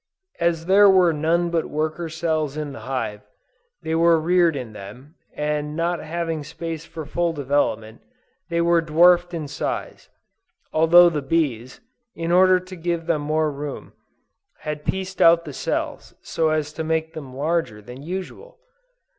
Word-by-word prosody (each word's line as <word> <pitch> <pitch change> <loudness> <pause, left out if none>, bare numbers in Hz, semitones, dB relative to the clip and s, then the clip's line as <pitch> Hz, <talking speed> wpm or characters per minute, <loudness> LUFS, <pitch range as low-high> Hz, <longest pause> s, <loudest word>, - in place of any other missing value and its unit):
As 170 -1 0
there 200 +2 +6
were 185 -3 +5
none 170 +3 0
but 165 -1 0
worker 155 +2 -2
cells 155 -3 -2
in 150 -2 -4
the - - -9
hive, 105 -6 -3 0.6
they 160 - -2
were 165 0 +4
reared 170 0 +3
in 125 -5 -6
them, 105 +9 -11 0.2
and 150 0 -2
not 170 +1 -1
having 165 -1 -3
space 165 +1 -6
for 160 -2 -7
full 170 +3 -1
development, 135 -6 -1 0.5
they 170 0 0
were 170 0 +3
dwarfed 175 +2 +4
in 160 -4 -4
size, - - -5 0.6
although 170 +2 +6
the 150 -3 -2
bees, 135 -5 -2 0.3
in 165 0 -3
order 185 +1 +5
to 185 +1 -11
give 170 -1 -3
them 165 -3 0
more 155 +1 0
room, 145 0 -7 0.7
had 150 -1 -5
pieced 190 0 -3
out 170 0 +6
the 145 - -7
cells - - -4
so 160 -1 0
as 155 -1 -1
to 160 - -4
make 160 0 -1
them 135 -5 -9
larger 145 -6 -1
than 125 +5 -11
usual! 190 - -7
160 Hz, 155 wpm, -22 LUFS, 150-170 Hz, 0.7 s, there